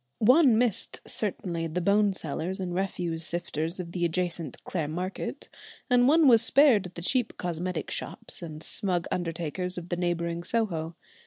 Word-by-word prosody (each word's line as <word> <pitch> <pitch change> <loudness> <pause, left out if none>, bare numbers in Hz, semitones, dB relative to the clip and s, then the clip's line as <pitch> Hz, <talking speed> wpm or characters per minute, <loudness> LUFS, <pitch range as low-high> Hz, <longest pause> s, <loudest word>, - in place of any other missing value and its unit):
One 255 +1 +5
missed 235 -4 0
certainly 175 -5 -3
the 165 +3 -2
bone 200 +3 +3
sellers 180 +3 -3
and 180 -2 -3
refuse 175 -3 -2
sifters 170 0 -3
of 170 -2 -5
the 175 0 -2
adjacent 170 -4 -2
Clare 165 -5 -2
Market, 180 +5 -4 0.4
and 245 0 +5
one 310 +1 +5
was 230 -3 +7
spared 250 -4 +5
the 175 -1 -8
cheap 245 +4 +1
cosmetic 175 -1 -3
shops - - -3
and 155 -2 -7
smug 180 -4 -1
undertakers 175 +1 -3
of 175 0 -7
the 175 - -1
neighbouring 170 -1 -1
Soho. 170 -6 -1
180 Hz, 155 wpm, -28 LUFS, 170-205 Hz, 0.4 s, was